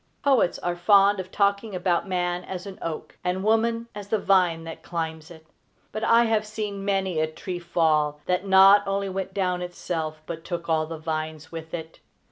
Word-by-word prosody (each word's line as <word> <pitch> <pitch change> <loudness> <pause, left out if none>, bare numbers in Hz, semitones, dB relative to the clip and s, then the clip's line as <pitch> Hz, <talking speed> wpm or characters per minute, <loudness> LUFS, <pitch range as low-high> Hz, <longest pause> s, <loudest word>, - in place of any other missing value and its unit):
Poets 265 -10 +3
are 175 0 -2
fond 200 +2 +5
of 185 0 -6
talking 200 +1 +1
about 180 0 0
man 180 -1 -1
as 185 0 -6
an 195 -1 -9
oak, 160 -2 -6
and 180 +1 -1
woman 230 +2 +1
the 205 +1 -2
vine 180 -5 +2
that 165 0 -8
climbs 160 -2 -4
it; 160 -2 -14 0.5
but 215 - -4
I 230 +1 +5
have 225 -2 +1
seen 210 -2 -5
many 190 -4 0
a 155 - +2
tree 175 +3 -6
fall 155 -4 +1
that 180 +2 -1
not 195 +1 +7
only 195 0 -1
went 190 0 -4
down 180 -2 0
itself, 160 -3 -4
but 165 0 -6
took 170 -1 -5
all 160 -1 +1
the 165 0 -6
vines 155 0 -4
with 165 0 -6
it. 160 -1 -8
180 Hz, 185 wpm, -25 LUFS, 165-200 Hz, 0.5 s, not